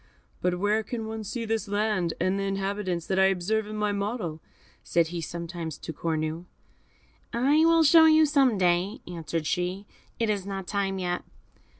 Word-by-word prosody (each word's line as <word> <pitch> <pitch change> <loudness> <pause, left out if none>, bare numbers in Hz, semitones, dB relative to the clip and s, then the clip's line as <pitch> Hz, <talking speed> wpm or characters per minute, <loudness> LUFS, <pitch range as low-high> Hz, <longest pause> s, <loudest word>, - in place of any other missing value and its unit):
"But 180 0 +1
where 205 +3 +1
can 225 0 -5
one 220 0 -5
see 230 +3 -4
this 225 -1 -1
land, 205 -4 0
and 185 +3 +1
the - - -1
inhabitants, 195 -3 -2
that 190 0 0
I 190 - +6
observe 195 +3 0
in 215 - -6
my 210 -1 0
model?" 200 -6 -3 0.4
said 170 -1 +1
he 170 0 -4
sometimes 170 -1 -5
to 160 - -7
Cornue. 160 +1 -2 0.9
"I 280 +7 +3
will 330 0 +5
show 320 +1 +7
you 315 0 +6
some 275 -6 +3
day," 180 +3 +1
answered 165 -2 -4
she; 180 +4 -2 0.3
"it 230 - 0
is 205 -3 0
not 195 -1 -5
time 195 0 -1
yet." 180 -1 -2
195 Hz, 175 wpm, -27 LUFS, 175-220 Hz, 0.9 s, show